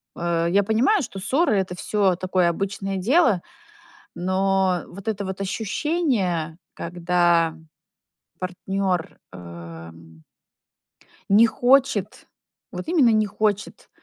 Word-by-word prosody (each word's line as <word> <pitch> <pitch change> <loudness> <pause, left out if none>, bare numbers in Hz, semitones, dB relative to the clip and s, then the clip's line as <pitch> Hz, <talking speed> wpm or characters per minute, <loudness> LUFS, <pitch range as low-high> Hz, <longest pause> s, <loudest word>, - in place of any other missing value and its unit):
э, 170 -1 0
я 200 +1 +4
понимаю, 240 - +2
что 195 - -7
ссоры- 260 - +1
это 180 -1 -3
всё 195 -1 +1
такое 185 -1 +1
обычное 195 +2 -3
дело, 225 - +3 0.7
но 190 0 +1
вот 200 +3 -11
это 205 -2 -2
вот 190 +1 -6
ощущение, 200 - -1 0.2
когда 170 -1 +1 0.8
партнёр 185 -1 -3
э 85 -2 -10 1.4
не 220 +4 +6
хочет, 245 -3 +1 0.4
вот - - -7
именно 305 -9 +4
не 215 -1 +3
хочет, 205 0 -2
190 Hz, 105 wpm, -23 LUFS, 175-215 Hz, 1.4 s, не